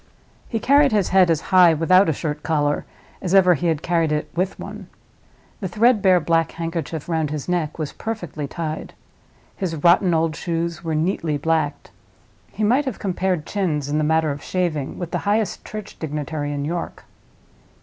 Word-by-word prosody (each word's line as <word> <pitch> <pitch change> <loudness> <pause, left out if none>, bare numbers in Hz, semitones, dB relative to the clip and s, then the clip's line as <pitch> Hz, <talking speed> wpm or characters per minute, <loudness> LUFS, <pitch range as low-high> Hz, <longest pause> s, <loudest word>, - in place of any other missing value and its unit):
He 225 - -1
carried 280 +4 +4
his 205 -3 +1
head 185 -2 +5
as 160 -2 +2
high 180 -3 +7
without 185 +3 +4
a - - +2
shirt 150 0 -4
collar 145 -2 0 0.4
as 185 +1 0
ever 180 -2 +6
he 170 +2 -1
had 160 -2 0
carried 165 -3 +1
it 150 0 -2
with 185 +3 -1
one. - - -8 0.7
The 195 - -3
threadbare 205 -2 +4
black 165 0 +1
handkerchief 165 -2 -4
round 160 -3 0
his 150 -2 -5
neck 175 -4 -1
was 155 -3 -4
perfectly 175 -10 -5
tied; 155 +1 -5 0.6
his 180 -4 -3
rotten 170 +3 +4
old 160 -1 +1
shoes 170 0 -3
were 160 -2 -2
neatly 155 -2 0
blacked; 155 -1 -1 0.6
he 215 - -4
might 250 +7 +3
have 260 -6 -3
compared 185 -4 -1
chins, 155 -8 -1
in 150 +1 0
the - - +1
matter 160 0 +2
of 140 - -5
smooth - - -11
shaving, 165 -7 -1
with 175 -2 -5
the - - -1
highest 215 0 0
church 215 -1 -8
dignitary 150 -1 -3
in 145 -1 -3
York. 170 +2 -4
165 Hz, 180 wpm, -22 LUFS, 155-185 Hz, 0.7 s, high